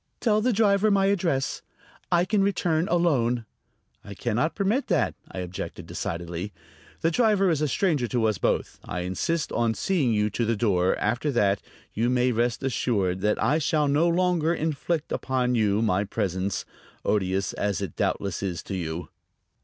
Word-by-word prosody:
"Tell 215 -2 +2
the 250 +3 +2
driver 205 -1 +3
my 195 -1 +3
address; 175 -9 0 0.5
I 175 0 +4
can 205 +1 +1
return 175 -4 +1
alone." 125 -9 +1 0.6
"I 100 - -9
can 115 +2 -2
not 155 +6 +1
permit 215 +7 0
that," 110 -9 +1 0.2
I - - -9
objected 90 +1 -6
decidedly. 85 +3 -4 0.5
"The 165 - +2
driver 200 -2 +3
is 155 -2 0
a 150 - +2
stranger 150 -5 +1
to 120 -1 0
us 105 -5 +1
both. - - -1
I 90 - -4
insist 120 - -1
on 115 -1 +1
seeing 160 - +1
you 105 -1 +1
to 120 - -1
the 115 0 +1
door; 95 -5 +2
after 120 +8 0
that 100 -4 +2 0.3
you 115 +3 +1
may 125 0 +2
rest 120 +1 0
assured 100 -8 0
that 105 +1 +2
I 150 +4 +3
shall 150 0 +1
no 150 +4 +3
longer 175 -1 +2
inflict 160 0 -2
upon 125 -1 0
you 110 -2 +2
my 100 -2 +2
presence, 95 -2 -2 0.4
odious 95 -2 0
as 100 -1 -1
it 100 -6 -5
doubtless 100 -3 -1
is 90 -4 -3
to 100 - -5
you." 85 -1 -4
125 Hz, 170 wpm, -26 LUFS, 100-170 Hz, 0.6 s, I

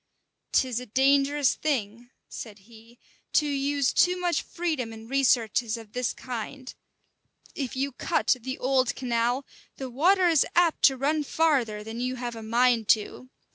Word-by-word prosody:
"'Tis 250 -3 +1
a 250 - -9
dangerous 275 +3 +3
thing," 240 -5 -3 0.2
said 215 -3 -9
he, 230 +1 -17 0.4
"to 300 - +3
use 280 -1 0
too 360 0 +3
much 350 -1 0
freedom 310 -9 -3
in 225 0 -11
researches 240 -3 +1
of 225 -2 -13
this 250 -1 -1
kind. 255 +2 -7 0.8
If 265 -4 -4
you 275 +2 -1
cut 255 - +1
the 260 +2 -5
old 260 -1 +1
canal, 245 +1 -1 0.3
the 260 -2 -6
water 360 +8 +3
is 325 -4 +4
apt 345 -2 +3
to 270 -2 +4
run 300 +3 0
farther 265 -10 0
than 225 +2 -7
you 255 +1 -2
have 240 -1 -5
a 225 - -8
mind 230 0 +2
to. 235 +4 -10
255 Hz, 155 wpm, -26 LUFS, 235-280 Hz, 0.8 s, is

